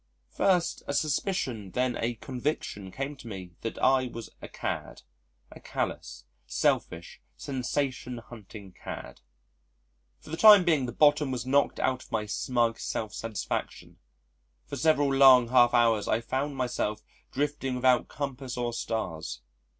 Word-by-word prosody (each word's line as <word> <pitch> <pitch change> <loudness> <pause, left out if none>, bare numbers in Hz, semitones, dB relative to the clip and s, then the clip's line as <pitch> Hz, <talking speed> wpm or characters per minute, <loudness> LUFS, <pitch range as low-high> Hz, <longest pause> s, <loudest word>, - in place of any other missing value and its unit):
First 180 -3 +1
a 140 - -2
suspicion 135 - -1
then 125 +4 0
a 120 +1 -2
conviction 125 -5 -4
came 135 +7 -4
to 120 - -12
me 95 -4 -7
that 115 - -4
I 130 -1 +3
was 115 -1 -8
a - - -7
cad - - -5 0.5
a - - -12
callous, - - -4 0.2
selfish, 85 +3 -1 0.2
sensation 130 -2 -3
hunting 110 -4 -11
cad.... 90 - -9 1.0
For - - -14
the 165 - -3
time 210 -1 +9
being 155 -7 +2
the - - -4
bottom 150 +2 +4
was 125 -2 -3
knocked 140 +2 +2
out 130 -1 0
of - - -16
my 110 -1 -1
smug 115 +2 0
self 110 -2 -4
satisfaction. 115 -2 -5 0.7
For - - -6
several 145 -3 +2
long 130 -3 +7
half 120 -1 +5
hours 115 -3 +3
I 110 - +2
found 135 +4 -3
myself 120 -4 -2 0.3
drifting 145 -2 -2
without 125 -1 +3
compass 135 -3 -5
or 120 -1 -2
stars. 80 - -4
125 Hz, 140 wpm, -28 LUFS, 115-140 Hz, 1.0 s, time